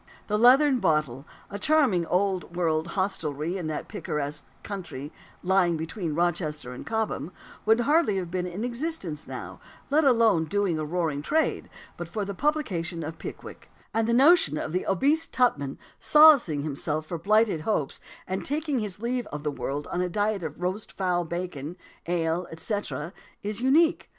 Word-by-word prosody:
"The 210 Hz, 0 st, 0 dB
Leathern 260 Hz, +3 st, +6 dB
Bottle," 150 Hz, -, 0 dB, 0.2 s
a 200 Hz, -, -5 dB
charming 255 Hz, -, +3 dB
old 185 Hz, -2 st, 0 dB
world 160 Hz, -2 st, +1 dB
hostelry 170 Hz, -4 st, -1 dB
in 180 Hz, -4 st, -3 dB
that 155 Hz, -1 st, -4 dB
picturesque 150 Hz, 0 st, -4 dB, 0.2 s
country 170 Hz, -8 st, -6 dB, 0.3 s
lying 180 Hz, -2 st, +3 dB
between 160 Hz, 0 st, -4 dB
Rochester 155 Hz, -6 st, -1 dB
and 125 Hz, -, -8 dB
Cobham, 220 Hz, -6 st, -2 dB, 0.4 s
would 225 Hz, +2 st, +5 dB
hardly 290 Hz, -5 st, +3 dB
have 180 Hz, -3 st, -4 dB
been 180 Hz, 0 st, -1 dB
in 180 Hz, +5 st, -5 dB
existence 240 Hz, -, -3 dB
now, -, -, -7 dB, 0.3 s
let 310 Hz, +2 st, +4 dB
alone 230 Hz, -, +4 dB
doing 185 Hz, -1 st, 0 dB
a 155 Hz, -, -2 dB
roaring 160 Hz, -3 st, -1 dB
trade, 315 Hz, -, 0 dB, 0.3 s
but 175 Hz, -, -5 dB
for 205 Hz, +4 st, -3 dB
the 200 Hz, -, -4 dB
publication 185 Hz, -, -1 dB
of 155 Hz, +2 st, -6 dB
Pickwick; -, -, -9 dB, 0.2 s
and 225 Hz, 0 st, +1 dB
the -, -, +1 dB
notion 270 Hz, -, +5 dB
of 155 Hz, -, -3 dB
the 180 Hz, +2 st, -2 dB
obese 290 Hz, -, +2 dB
Tupman 145 Hz, -, +1 dB, 0.2 s
solacing 285 Hz, -, +6 dB
himself 155 Hz, +1 st, -2 dB
for 170 Hz, +1 st, -5 dB
blighted 210 Hz, -2 st, +3 dB
hopes 155 Hz, -6 st, -1 dB, 0.3 s
and 190 Hz, +1 st, -3 dB
taking 295 Hz, -1 st, -1 dB
his 205 Hz, -3 st, -4 dB
leave 245 Hz, +1 st, -2 dB
of 150 Hz, 0 st, -6 dB
the 150 Hz, -, -1 dB
world 145 Hz, +1 st, -4 dB
on 180 Hz, -, 0 dB
a 180 Hz, -, 0 dB
diet 205 Hz, +2 st, 0 dB
of 155 Hz, -3 st, -6 dB
roast 185 Hz, +4 st, -3 dB
fowl 180 Hz, -2 st, 0 dB
bacon, 170 Hz, -2 st, -5 dB, 0.3 s
ale, 170 Hz, 0 st, 0 dB
etc., 170 Hz, -1 st, -4 dB, 0.3 s
is 210 Hz, +2 st, -3 dB
unique. 310 Hz, +6 st, +3 dB
180 Hz, 165 wpm, -26 LUFS, 160-225 Hz, 0.4 s, Leathern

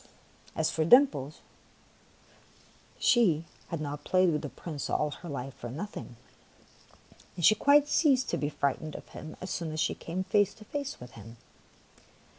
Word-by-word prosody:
As 160 Hz, -, +1 dB
for 160 Hz, -, 0 dB
Dimples, 155 Hz, -, +4 dB, 1.6 s
she 175 Hz, -10 st, +3 dB, 0.2 s
had 165 Hz, -, -4 dB
not 145 Hz, -1 st, -5 dB
played 185 Hz, -1 st, +3 dB
with 150 Hz, -, -1 dB
the 145 Hz, -, -5 dB
Prince 150 Hz, -2 st, -6 dB
all 150 Hz, -1 st, 0 dB
her 170 Hz, +4 st, -9 dB
life 135 Hz, -2 st, -5 dB
for 120 Hz, -, -8 dB
noth 195 Hz, -, -6 dB
ing, 120 Hz, -, -8 dB, 1.2 s
and 175 Hz, -3 st, 0 dB
she -, -, +8 dB
quite 285 Hz, +6 st, +4 dB
ceased 275 Hz, -4 st, +3 dB
to -, -, 0 dB
be 145 Hz, -, -1 dB
frightened 145 Hz, +1 st, -2 dB
of -, -, -10 dB
him 155 Hz, -, -9 dB
as 185 Hz, -, -5 dB
soon 165 Hz, -3 st, -3 dB
as 155 Hz, -, -4 dB
she -, -, +1 dB
came 180 Hz, +3 st, -4 dB
face 205 Hz, +1 st, +2 dB
to 215 Hz, -1 st, -14 dB
face 285 Hz, +4 st, -5 dB
with 125 Hz, 0 st, -11 dB
him. 115 Hz, +1 st, -12 dB
160 Hz, 170 wpm, -29 LUFS, 145-205 Hz, 1.6 s, she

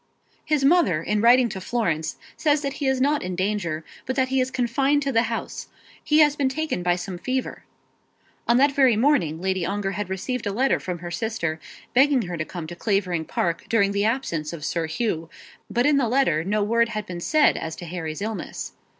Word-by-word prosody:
"His 295 Hz, -3 st, +1 dB
mother 275 Hz, -, +3 dB
in 210 Hz, +3 st, 0 dB
writing 245 Hz, +2 st, +6 dB
to 190 Hz, -, -6 dB
Florence 180 Hz, -9 st, -1 dB, 0.2 s
says 300 Hz, -1 st, +1 dB
that 275 Hz, -1 st, -2 dB
he 280 Hz, -, +1 dB
is 265 Hz, -1 st, +1 dB
not 290 Hz, +3 st, +2 dB
in 180 Hz, 0 st, -4 dB
danger; 185 Hz, -5 st, -2 dB, 0.2 s
but 260 Hz, -, -1 dB
that 260 Hz, -1 st, +1 dB
he 265 Hz, 0 st, +2 dB
is 255 Hz, -, 0 dB
confined 270 Hz, +4 st, +1 dB
to 275 Hz, -, -1 dB
the 230 Hz, -2 st, +3 dB
house. 230 Hz, -, -5 dB, 0.4 s
He 305 Hz, 0 st, +4 dB
has 295 Hz, -1 st, +5 dB
been 275 Hz, -3 st, +1 dB
taken 310 Hz, -, -2 dB
by 175 Hz, 0 st, +2 dB
some 180 Hz, 0 st, -6 dB
fever." 255 Hz, +5 st, -3 dB, 0.8 s
On 235 Hz, -, +4 dB
that 280 Hz, +2 st, +4 dB
very 265 Hz, -4 st, +4 dB
morning 220 Hz, -, +2 dB
Lady 190 Hz, 0 st, -1 dB
Ongar 195 Hz, +2 st, -2 dB
had 205 Hz, -2 st, -4 dB
received 215 Hz, +5 st, -3 dB
a -, -, 0 dB
letter 260 Hz, +7 st, +2 dB
from 180 Hz, -1 st, -4 dB
her 175 Hz, -, -5 dB
sister, 170 Hz, -6 st, -2 dB, 0.3 s
begging 270 Hz, -1 st, +4 dB
her 175 Hz, -2 st, -5 dB
to 155 Hz, -1 st, -3 dB
come 175 Hz, -1 st, -7 dB
to 175 Hz, +2 st, -8 dB
Clavering 180 Hz, -4 st, 0 dB
Park 170 Hz, +1 st, -2 dB
during 200 Hz, -3 st, +3 dB
the 200 Hz, 0 st, 0 dB
absence 195 Hz, -, -1 dB
of 155 Hz, -3 st, -6 dB
Sir 165 Hz, -2 st, -1 dB
Hugh; 165 Hz, -3 st, -2 dB, 0.4 s
but 240 Hz, +1 st, +1 dB
in 295 Hz, -1 st, +4 dB
the 250 Hz, -5 st, +1 dB
letter 240 Hz, -, +2 dB
no 205 Hz, +3 st, 0 dB
word 230 Hz, +2 st, +2 dB
had 215 Hz, -3 st, -4 dB
been 175 Hz, -1 st, -6 dB
said 305 Hz, -, +3 dB
as 160 Hz, 0 st, -4 dB
to 175 Hz, -, -8 dB
Harry's 165 Hz, 0 st, -5 dB
illness. 220 Hz, 0 st, -5 dB
215 Hz, 210 wpm, -24 LUFS, 175-265 Hz, 0.8 s, writing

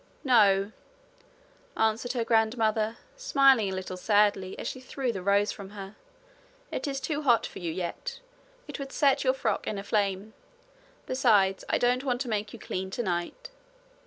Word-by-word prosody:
'No, 205 Hz, -6 st, +4 dB, 1.1 s
answered 220 Hz, +3 st, +1 dB
her 240 Hz, -3 st, 0 dB
grandmother, 220 Hz, -1 st, +1 dB, 0.2 s
smiling 275 Hz, -, +4 dB
a -, -, -3 dB
little 185 Hz, 0 st, -5 dB
sadly, 205 Hz, -1 st, +2 dB
as -, -, -5 dB
she 260 Hz, -, -5 dB
threw 260 Hz, 0 st, -3 dB
the 195 Hz, -4 st, -5 dB
rose 200 Hz, +2 st, +2 dB
from 195 Hz, -1 st, -9 dB
her; 195 Hz, +1 st, -8 dB, 0.8 s
'it -, -, -3 dB
is 275 Hz, -1 st, -2 dB
too 290 Hz, +3 st, -2 dB
hot 245 Hz, -6 st, +3 dB
for -, -, -8 dB
you 170 Hz, -2 st, -3 dB
yet. 185 Hz, -, -5 dB, 0.5 s
It -, -, -7 dB
would 275 Hz, -1 st, -6 dB
set 280 Hz, -1 st, +2 dB
your 260 Hz, -1 st, +2 dB
frock 220 Hz, -6 st, -2 dB
in 210 Hz, -, -2 dB
a 195 Hz, -, -5 dB
flame. 205 Hz, 0 st, -1 dB, 0.7 s
Besides, 210 Hz, -7 st, +2 dB
I -, -, +2 dB
don't 250 Hz, +1 st, +1 dB
want 250 Hz, -3 st, -1 dB
to 255 Hz, -, -3 dB
make 210 Hz, -1 st, -2 dB
you -, -, -9 dB
clean 190 Hz, +1 st, -4 dB
tonight. 195 Hz, -, -3 dB
220 Hz, 165 wpm, -28 LUFS, 195-260 Hz, 1.1 s, No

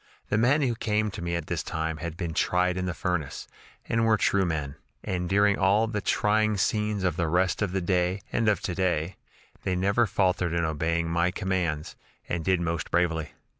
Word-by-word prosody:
The 105 Hz, -, +1 dB
men 140 Hz, +6 st, +3 dB
who 125 Hz, -3 st, +1 dB
came 110 Hz, -2 st, 0 dB
to 95 Hz, -, -7 dB
me 85 Hz, 0 st, -2 dB
at 85 Hz, -2 st, -3 dB
this -, -, -2 dB
time 80 Hz, 0 st, -3 dB
had 85 Hz, +1 st, -6 dB
been 85 Hz, -3 st, -3 dB
'tried 90 Hz, +2 st, +1 dB
in 90 Hz, 0 st, -2 dB
the 90 Hz, -, -2 dB
furnace,' 90 Hz, -7 st, -3 dB, 0.4 s
and 115 Hz, 0 st, +1 dB
were 110 Hz, -1 st, +4 dB
true 100 Hz, -1 st, +2 dB
men, 75 Hz, -5 st, -2 dB, 0.3 s
and 90 Hz, -1 st, -2 dB
during 100 Hz, +1 st, +3 dB
all 100 Hz, +3 st, +4 dB
the 105 Hz, -2 st, -3 dB
trying 110 Hz, +1 st, +2 dB
scenes 105 Hz, +1 st, 0 dB
of 90 Hz, -3 st, 0 dB
the 85 Hz, -2 st, +1 dB
rest 90 Hz, +3 st, +1 dB
of 100 Hz, -3 st, 0 dB
the 95 Hz, 0 st, -1 dB
day 90 Hz, +2 st, 0 dB
and 115 Hz, -2 st, +2 dB
of 105 Hz, -, +1 dB
to 90 Hz, -, -2 dB
day, 90 Hz, -1 st, -1 dB, 0.4 s
they 95 Hz, -, -1 dB
never 100 Hz, +6 st, +2 dB
faltered 90 Hz, -4 st, +1 dB
in 85 Hz, -1 st, +1 dB
obeying 80 Hz, +2 st, 0 dB
my 85 Hz, +1 st, +1 dB
commands, 90 Hz, -6 st, -2 dB, 0.3 s
and 85 Hz, -2 st, -2 dB
did 95 Hz, 0 st, +2 dB
most 85 Hz, -1 st, -2 dB
bravely. 80 Hz, -3 st, 0 dB
90 Hz, 205 wpm, -27 LUFS, 85-100 Hz, 0.4 s, were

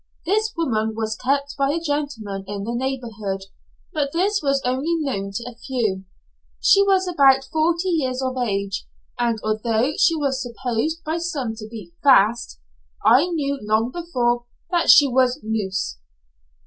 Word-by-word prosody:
This 430 Hz, +5 st, +1 dB
woman 220 Hz, -9 st, 0 dB
was 220 Hz, -1 st, -2 dB
kept 280 Hz, +4 st, -1 dB
by 275 Hz, 0 st, +1 dB
a 335 Hz, -, -1 dB
gentleman 285 Hz, -11 st, -3 dB
in 200 Hz, 0 st, -4 dB
the 230 Hz, +3 st, -3 dB
neighbourhood, 235 Hz, -6 st, -3 dB, 0.5 s
but 290 Hz, -3 st, -1 dB
this 400 Hz, +5 st, +1 dB
was 275 Hz, -1 st, +1 dB
only 265 Hz, +7 st, 0 dB
known 265 Hz, -11 st, -2 dB
to 235 Hz, -, -4 dB
a 245 Hz, -, -8 dB
few. 225 Hz, -6 st, -2 dB, 0.5 s
She 395 Hz, -, +5 dB
was 385 Hz, -2 st, +3 dB
about 275 Hz, -6 st, +5 dB
forty 335 Hz, +3 st, +1 dB
years 260 Hz, -7 st, 0 dB
of 260 Hz, -1 st, -2 dB
age, 200 Hz, -5 st, -2 dB, 0.3 s
and 235 Hz, -2 st, +1 dB
although 220 Hz, +5 st, 0 dB
she 330 Hz, -, +4 dB
was 275 Hz, -3 st, -1 dB
supposed 245 Hz, +6 st, -2 dB
by 320 Hz, +2 st, -2 dB
some 285 Hz, -9 st, -3 dB
to 215 Hz, -1 st, -8 dB
be 210 Hz, -7 st, -10 dB
'fast,' 235 Hz, -4 st, +4 dB, 0.5 s
I 270 Hz, +8 st, +6 dB
knew 285 Hz, -5 st, -2 dB
long 220 Hz, +3 st, +1 dB
before 245 Hz, -8 st, -1 dB, 0.3 s
that 345 Hz, -1 st, +1 dB
she 285 Hz, -, +8 dB
was 255 Hz, +1 st, +2 dB
'loose.' 195 Hz, -, -2 dB
255 Hz, 155 wpm, -22 LUFS, 220-305 Hz, 0.5 s, she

